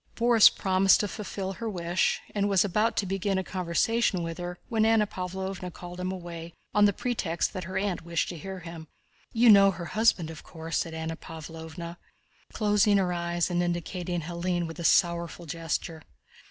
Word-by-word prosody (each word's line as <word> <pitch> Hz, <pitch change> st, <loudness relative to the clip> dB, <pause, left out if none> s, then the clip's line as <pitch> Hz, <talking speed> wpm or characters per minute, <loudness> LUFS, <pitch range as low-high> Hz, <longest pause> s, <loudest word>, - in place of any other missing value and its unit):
Borís 235 Hz, -2 st, +7 dB
promised 190 Hz, 0 st, +3 dB
to 205 Hz, -, -1 dB
fulfill 195 Hz, -2 st, -5 dB
her 230 Hz, +3 st, -4 dB
wish 175 Hz, -2 st, 0 dB
and 205 Hz, -1 st, +1 dB
was 195 Hz, +1 st, +4 dB
about 210 Hz, +4 st, +1 dB
to 205 Hz, -, +1 dB
begin 195 Hz, +1 st, -1 dB
a 190 Hz, -, 0 dB
conversation 185 Hz, +2 st, 0 dB
with 165 Hz, 0 st, -5 dB
her, 175 Hz, 0 st, -5 dB
when 220 Hz, -2 st, +1 dB
Anna 220 Hz, -1 st, +4 dB
Pávlovna 190 Hz, -1 st, -5 dB
called 175 Hz, +1 st, -9 dB
him 185 Hz, 0 st, -2 dB
away 170 Hz, -2 st, -7 dB, 0.2 s
on 205 Hz, 0 st, +5 dB
the 205 Hz, -, +5 dB
pretext 190 Hz, -6 st, -2 dB
that 185 Hz, -2 st, -5 dB
her 185 Hz, +2 st, -4 dB
aunt 195 Hz, -3 st, -1 dB
wished 170 Hz, 0 st, -1 dB
to 175 Hz, -, -6 dB
hear 190 Hz, +3 st, -7 dB
him. 165 Hz, -1 st, -9 dB, 0.4 s
"You 235 Hz, 0 st, +6 dB
know 200 Hz, -1 st, +8 dB
her 175 Hz, -2 st, -5 dB
husband, 215 Hz, -7 st, +2 dB
of 160 Hz, -, -10 dB
course?" 165 Hz, -1 st, -4 dB
said 165 Hz, -1 st, -3 dB
Anna 160 Hz, 0 st, -4 dB
Pávlovna, 165 Hz, +1 st, -8 dB, 0.5 s
closing 210 Hz, -1 st, +3 dB
her 180 Hz, -2 st, +1 dB
eyes 170 Hz, 0 st, -1 dB
and 175 Hz, 0 st, +1 dB
indicating 175 Hz, 0 st, -2 dB
Hélène 175 Hz, +1 st, -2 dB
with 165 Hz, 0 st, -8 dB
a -, -, -4 dB
sorrowful 170 Hz, 0 st, +2 dB
gesture. 165 Hz, 0 st, -3 dB
180 Hz, 180 wpm, -28 LUFS, 170-200 Hz, 0.5 s, know